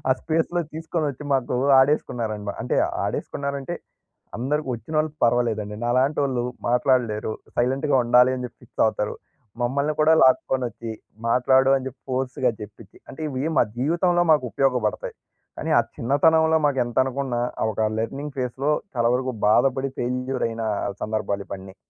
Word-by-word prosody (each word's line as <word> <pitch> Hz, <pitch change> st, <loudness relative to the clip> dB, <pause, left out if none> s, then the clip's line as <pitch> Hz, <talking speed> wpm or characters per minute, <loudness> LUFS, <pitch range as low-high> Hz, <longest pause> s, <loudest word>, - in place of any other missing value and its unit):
ఆ 130 Hz, -, +6 dB
స్పేస్‌లో 165 Hz, +2 st, 0 dB
తీసుకొనొచ్చి 155 Hz, -3 st, -3 dB
మాకు 130 Hz, -1 st, 0 dB, 0.2 s
ఆడేసుకున్నారండి. 115 Hz, -7 st, 0 dB
అంటే -, -, -1 dB, 0.3 s
ఆడేసుకున్నారంటే, 140 Hz, +3 st, -3 dB, 0.6 s
అందరికి 140 Hz, +3 st, -1 dB
వచ్చినోళ్ళు 155 Hz, +6 st, -1 dB
పర్వాలేదండి. 115 Hz, -3 st, 0 dB
నాలాంటోళ్ళు 130 Hz, 0 st, +1 dB, 0.2 s
మాట్లాడలేరు. 120 Hz, -4 st, +1 dB, 0.2 s
సైలెంట్‌గా 135 Hz, +4 st, +1 dB
ఉండాలి 125 Hz, +2 st, +5 dB
అని 125 Hz, -, -5 dB
చెప్పి 120 Hz, -, -16 dB
ఫిక్స్ -, -, -2 dB
అవుతారు. 105 Hz, -1 st, -1 dB, 0.5 s
మమ్మల్ని 140 Hz, +5 st, 0 dB
కూడా 155 Hz, +1 st, +5 dB
లాక్కొనొచ్చి, 120 Hz, -3 st, +1 dB, 0.4 s
మాట్లాడు 130 Hz, +2 st, +4 dB
అని 130 Hz, -1 st, -4 dB
చెప్పి, 130 Hz, -1 st, -15 dB
ఫోర్స్‌గా 130 Hz, 0 st, 0 dB
చెప్పిచ్చి 105 Hz, -1 st, -11 dB
అంటే 135 Hz, -, -11 dB
ఇవి 135 Hz, +1 st, -3 dB
మా -, -, +6 dB
జీవితంలో 175 Hz, +5 st, +2 dB
మాకు 150 Hz, -4 st, +2 dB
ఉపయోగపడతాయి. 125 Hz, -3 st, 0 dB, 0.4 s
కానీ -, -, -3 dB
ఆ -, -, +7 dB, 0.2 s
చిన్నతనంలో 160 Hz, +5 st, +3 dB
మాకు 140 Hz, -2 st, 0 dB
ఎంతనుకున్నా 130 Hz, +1 st, -1 dB, 0.2 s
ఆహ్, 110 Hz, -, +2 dB
ఒక 110 Hz, +1 st, 0 dB
లెర్నింగ్ 135 Hz, +6 st, -4 dB
ఫేస్‍లో 130 Hz, +3 st, -1 dB, 0.2 s
చాలా 115 Hz, -1 st, +3 dB
వరకు 130 Hz, 0 st, -2 dB, 0.2 s
బాధపడి. 135 Hz, +4 st, +2 dB
ఫెయిల్యూర్ 125 Hz, +1 st, -2 dB
అయిన 115 Hz, 0 st, -5 dB, 0.4 s
సందర్భాలు 105 Hz, -2 st, -2 dB
ఇవన్నీ. 95 Hz, -1 st, -8 dB
130 Hz, 130 wpm, -23 LUFS, 120-140 Hz, 0.6 s, ఆ